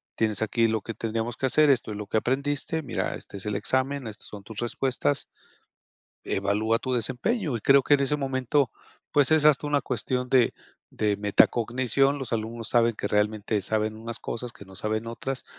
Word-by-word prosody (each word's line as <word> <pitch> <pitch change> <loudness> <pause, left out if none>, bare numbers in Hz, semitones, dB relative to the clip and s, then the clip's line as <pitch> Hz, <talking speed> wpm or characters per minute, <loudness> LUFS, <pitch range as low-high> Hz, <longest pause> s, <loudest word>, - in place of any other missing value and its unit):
tienes 110 -2 0
aquí 115 +1 +2
lo 110 -2 0
que 115 - -7
tendríamos 115 +1 -3
que - - -1
hacer, 150 +3 +4
esto 125 -5 +2
es 105 - -5
lo 105 - -6
que 110 - 0
aprendiste, 140 +6 -1
mira, 140 - -2
este 100 - -9
es 95 - -8
el 105 -1 -2
examen, 130 +4 -1
estas 105 -1 -8
son 105 -1 -9
tus 110 0 -11
respuestas, 120 - -1 1.0
evalúa 105 +3 +1
tu 130 +1 -3
desempeño", 130 - -1
y - - -6
creo 140 +3 +5
que, 145 - +4
en 140 - +2
ese 145 +2 +1
momento, 135 -1 0 0.4
pues, 145 0 +4
es 155 -1 +4
hasta 150 -1 +4
una 145 -1 +2
cuestión 125 +1 -2
de 125 -2 +4 0.4
de 105 -1 0
metacognición, 120 +6 +2
los 130 -3 -6
alumnos 115 0 -3
saben 115 -1 +3
que 105 - -3
realmente 105 0 0
saben 110 +2 0
unas 115 +1 -7
cosas 120 +1 -4
que 100 - -13
no 95 0 -13
saben 110 +2 -2
otras, 130 +3 -4
115 Hz, 195 wpm, -26 LUFS, 110-135 Hz, 1.0 s, creo